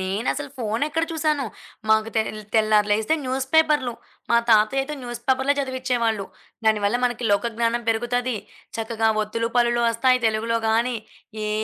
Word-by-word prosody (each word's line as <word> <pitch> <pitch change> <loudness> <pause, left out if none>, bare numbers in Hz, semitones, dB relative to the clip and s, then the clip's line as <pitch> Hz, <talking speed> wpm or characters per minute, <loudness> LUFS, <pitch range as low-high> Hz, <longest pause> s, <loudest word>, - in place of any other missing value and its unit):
నేనసలు 220 +9 -2
ఫోనెక్కడ 285 +9 -1
చూసాను. 305 -3 0 0.4
మాకు 220 0 +3
తె 220 - +4 0.3
తెల్లారి 215 -1 +3
లేగిస్తే, 215 +8 +2
న్యూసు 260 +1 -2
పేపర్లు. 300 -6 +3 0.4
మా 235 - +5
తాతయ్యయితే 270 +7 +3
న్యూసు 240 -1 -6
పేపరులే 265 +2 +3
చదివించేవాళ్ళు. 250 -6 -1 0.4
దానివల్ల 215 +1 +3
మనకి 245 -1 -1
లోక 205 +4 +2
జ్ఞానం 235 0 0
పెరుగుతది. 240 +1 0 0.4
చక్కగా 225 0 0
ఒత్తులు, 230 +2 -2
పల్లులు 240 0 +3
ఒస్తాయి. 255 +2 +2
తెలుగులో 225 +1 0
గానీ, 235 +2 +1 0.5
ఏ - - -2
235 Hz, 135 wpm, -23 LUFS, 220-260 Hz, 0.5 s, మా